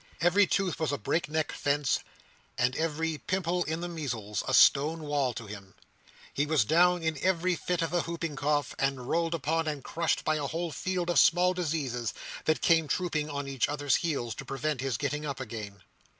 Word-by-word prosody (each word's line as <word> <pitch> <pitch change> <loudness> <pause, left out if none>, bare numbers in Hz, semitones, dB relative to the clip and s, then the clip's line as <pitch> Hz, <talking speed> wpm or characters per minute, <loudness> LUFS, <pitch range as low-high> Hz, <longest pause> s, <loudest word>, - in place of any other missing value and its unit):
Every 180 +4 +4
tooth 195 -4 0
was 160 -2 0
a 145 - -1
break 145 +8 -1
neck 155 -1 -1
fence, 145 -1 +1 0.6
and 125 +2 +1
every 160 -1 -1
pimple 180 -1 -1
in 160 +2 -3
the 175 - -3
measles 120 - -4
a - - -1
stone 155 +4 +5
wall 145 -3 0
to 115 - -6
him. 100 -2 -10 0.6
He 145 +1 0
was 150 -7 +3
down 175 +4 +4
in 160 -3 -1
every 185 -1 +2
fit 175 +1 -1
of 165 - -2
the 175 -1 +2
hooping 165 -2 -4
cough, 145 0 0
and 135 -2 -1
rolled 165 +2 +1
upon 160 +1 -1
and 145 -3 -3
crushed 170 +1 -1
by 155 0 +1
a 145 -2 -2
whole 165 +3 -3
field 180 +1 -2
of - - +4
small 180 +2 +5
diseases, 145 -10 -2 0.3
that 155 - +1
came 165 -2 +4
trooping 155 -1 -1
on 145 -1 -4
each 135 -2 0
other's 145 -2 +1
heels 140 -9 -2
to - - -7
prevent 135 0 -2
his 135 -5 -1
getting 150 +3 -2
up 140 -3 -4
again. 105 -6 -7
155 Hz, 195 wpm, -29 LUFS, 135-170 Hz, 0.6 s, stone